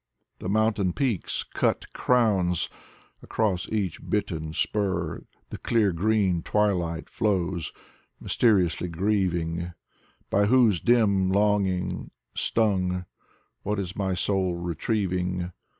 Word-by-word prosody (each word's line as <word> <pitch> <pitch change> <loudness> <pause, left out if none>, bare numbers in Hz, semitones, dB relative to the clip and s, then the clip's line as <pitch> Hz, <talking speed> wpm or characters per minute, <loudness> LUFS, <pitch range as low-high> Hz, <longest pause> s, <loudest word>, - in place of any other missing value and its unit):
The 90 - -4
mountain 105 -3 +2
peaks: 120 -2 -1
cut - - -1
crowns! 95 -8 +2 0.5
Across 100 -5 -1
each 100 -6 -2
bitten 80 -7 -1
spur 95 -1 -1 0.3
The - - -6
clear 110 -4 +2
green 95 -1 +1
twilight 90 -5 0
flows, 90 -5 -1 0.5
mjrsteriously 90 -6 +2
grieving. 85 -2 -1 0.6
By 100 +1 +3
whose 115 -7 +4
dim 105 -6 +3
longing 100 -3 +1 0.2
stung, 90 -5 0 0.6
what 105 +1 -2
is 95 -1 -4
my 95 -2 -1
soul 95 -2 0
retrieving? 90 0 -1
95 Hz, 100 wpm, -26 LUFS, 90-105 Hz, 0.6 s, whose